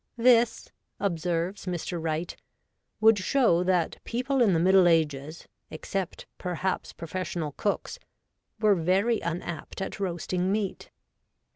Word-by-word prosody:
'This,' 235 Hz, -1 st, +4 dB, 0.3 s
observes 180 Hz, 0 st, -2 dB
Mr. 175 Hz, -1 st, -3 dB
Wright, 160 Hz, +1 st, -2 dB, 0.3 s
' -, -, -52 dB
would 220 Hz, -1 st, +6 dB
show 185 Hz, -5 st, +3 dB
that 180 Hz, -3 st, +1 dB
people 255 Hz, +3 st, -1 dB
in 220 Hz, -5 st, +5 dB
the 165 Hz, -, +2 dB
Middle 185 Hz, +1 st, +5 dB
Ages, 155 Hz, -2 st, 0 dB, 0.2 s
except, 185 Hz, +3 st, -4 dB
perhaps, 180 Hz, +1 st, -2 dB
professional 170 Hz, -2 st, -4 dB
cooks, 200 Hz, +8 st, -2 dB, 0.6 s
were 215 Hz, -1 st, +5 dB
very 195 Hz, +6 st, +2 dB
unapt 170 Hz, 0 st, -5 dB
at 195 Hz, -, -5 dB
roasting 180 Hz, 0 st, -1 dB
meat.' 205 Hz, -2 st, -2 dB
185 Hz, 120 wpm, -27 LUFS, 170-205 Hz, 0.6 s, would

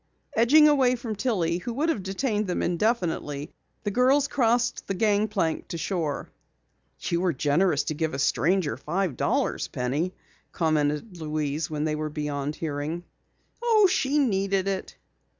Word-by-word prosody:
Edging 295 Hz, +7 st, +6 dB
away 265 Hz, -4 st, +4 dB
from 230 Hz, -3 st, -5 dB
Tillie 185 Hz, -7 st, 0 dB
who 235 Hz, +6 st, -5 dB
would 300 Hz, +7 st, 0 dB
have 225 Hz, -, 0 dB
detained 205 Hz, +2 st, -1 dB
them 180 Hz, -, -1 dB
indefinitely, 170 Hz, -, -1 dB, 0.3 s
the 205 Hz, -, -1 dB
girls 265 Hz, +5 st, +3 dB
crossed 240 Hz, -3 st, +1 dB
the 195 Hz, -, -2 dB
gangplank 205 Hz, -5 st, +1 dB
to 170 Hz, -, -5 dB
shore. 160 Hz, -3 st, -2 dB, 0.7 s
"You 170 Hz, 0 st, -1 dB
were 180 Hz, -2 st, +1 dB
generous 150 Hz, +3 st, +2 dB
to -, -, -2 dB
give 155 Hz, -1 st, -2 dB
a -, -, -3 dB
stranger 170 Hz, +4 st, +1 dB
five 175 Hz, -2 st, -2 dB
dollars, -, -, 0 dB
Penny," 145 Hz, +9 st, -2 dB, 0.4 s
commented 155 Hz, +3 st, 0 dB
Louise 150 Hz, 0 st, -2 dB
when 150 Hz, -1 st, -2 dB
they 155 Hz, 0 st, 0 dB
were 155 Hz, 0 st, -2 dB
beyond 150 Hz, -1 st, -3 dB
hearing. 155 Hz, +2 st, -3 dB, 0.6 s
"Oh, 450 Hz, -3 st, +5 dB
she 295 Hz, -6 st, +2 dB
needed 195 Hz, -7 st, +1 dB
it." 195 Hz, -1 st, -3 dB
185 Hz, 150 wpm, -26 LUFS, 155-230 Hz, 0.7 s, Edging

